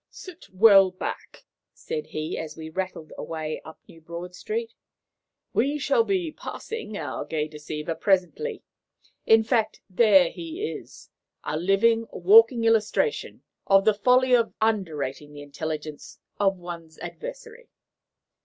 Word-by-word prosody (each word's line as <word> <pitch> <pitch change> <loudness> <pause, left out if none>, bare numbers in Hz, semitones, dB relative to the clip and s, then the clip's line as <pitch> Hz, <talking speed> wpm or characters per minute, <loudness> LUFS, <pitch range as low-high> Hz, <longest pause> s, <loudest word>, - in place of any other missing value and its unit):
"Sit 365 -2 -12
well 195 -1 +7
back," 185 - -7 0.3
said 465 -1 -5
he, 155 +1 -4
as 155 -1 -6
we 160 0 -8
rattled 185 -3 -5
away 155 -1 -4
up 160 - -12
New 165 - -16
Broad 170 +2 -8
Street. 455 - -4 0.8
"We 280 +5 +1
shall 460 - +2
be 370 -6 -1
passing 440 - -7
our - - -4
gay 155 -1 -2
deceiver 150 +1 -5
presently 195 - 0 0.6
in 225 0 +6
fact, 225 -1 0
there 190 -3 +5
he 340 +5 -5
is, - - -11 0.3
a - - -3
living, 215 +7 +2
walking 225 +6 +6
illustration 225 - +1 0.2
of 195 0 +5
the 215 - +5
folly 250 +5 +3
of 230 -2 +1
underrating 155 -10 -2
the 145 0 -9
intelligence 150 +1 -6 0.2
of 195 -2 +2
one's 170 -2 -9
adversary." - - -9
195 Hz, 130 wpm, -25 LUFS, 160-250 Hz, 0.8 s, well